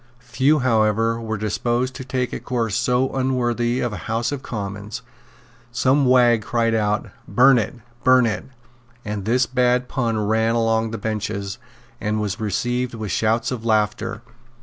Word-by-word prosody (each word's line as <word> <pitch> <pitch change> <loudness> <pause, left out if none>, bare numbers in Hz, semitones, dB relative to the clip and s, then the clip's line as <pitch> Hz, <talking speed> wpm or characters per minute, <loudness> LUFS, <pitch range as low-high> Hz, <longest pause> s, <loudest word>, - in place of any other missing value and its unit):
Few, 130 +5 +1
however, 115 -2 +2
were 110 -1 -3
disposed 120 +5 -1
to 130 - -7
take 125 -1 -2
a - - -3
course 115 -5 -2
so 125 +2 +1
unworthy 125 -2 0
of 120 -3 -1
a - - -4
House 115 +3 0
of 145 -2 -4
Commons. 105 +2 -6 0.7
Some 130 +3 +2
wag 120 -3 +5
cried 115 +1 0
out, 105 0 0 0.2
"Burn 130 0 +5
it; 110 - -3 0.3
burn 130 -1 +5
it;" 105 -4 -2 0.6
and 105 -2 -4
this 120 +3 +2
bad 125 0 +1
pun 115 -5 -1
ran 110 +2 +1
along 115 -1 +1
the 115 - -4
benches, 105 -3 -3 0.4
and 105 +1 -1
was 105 0 -2
received 120 +4 -1
with 110 -3 -5
shouts 115 +3 +1
of 120 -3 -4
laughter. 110 0 0
115 Hz, 155 wpm, -22 LUFS, 110-125 Hz, 0.7 s, wag